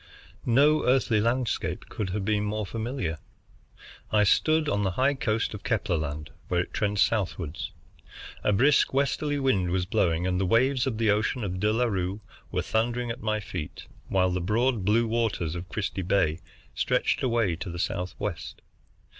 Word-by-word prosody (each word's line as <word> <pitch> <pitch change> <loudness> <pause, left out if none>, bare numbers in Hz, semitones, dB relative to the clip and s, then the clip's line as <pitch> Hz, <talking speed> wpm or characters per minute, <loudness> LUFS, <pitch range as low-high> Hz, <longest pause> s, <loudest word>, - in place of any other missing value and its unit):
No 145 +6 +4
earthly 125 -4 +3
landscape 120 +2 -1
could 105 -3 -4
have 95 +1 -2
been 105 0 +1
more 105 0 -2
familiar. 110 - -3 0.9
I 105 -1 +4
stood 155 +9 +3
on 105 -6 +1
the 95 -2 0
high 135 +2 +3
coast 115 -5 -1
of 105 - -7
Kepler 105 -6 0
Land 75 -1 -4 0.2
where 90 - +1
it - - -7
trends 105 -2 +2
southward. 90 -7 -2 0.8
A - - +3
brisk 130 +6 +3
westerly 140 +1 +1
wind 115 -10 +1
was 90 0 0
blowing 85 -2 +1
and 90 0 0
the - - +2
waves 130 +5 +3
of 115 -5 -2
the 110 -2 +3
ocean 105 +3 0
of 90 -2 -3
De 105 +2 +2
La 120 +3 +2
Bue 95 -1 -2 0.3
were - - -1
thundering 120 +2 0
at 115 - -7
my 110 0 0
feet, 90 -6 -6 0.2
while 95 -1 +2
the 90 0 -1
broad 115 +4 +1
blue 110 +4 +3
waters 110 -8 -1
of 90 +1 -6
Christie 100 -2 -3
Bay 90 -3 +1 0.3
stretched - - +1
away 115 -8 +1
to 95 - -6
the 85 - -6
southwest. 90 0 -4
105 Hz, 170 wpm, -27 LUFS, 90-120 Hz, 0.9 s, No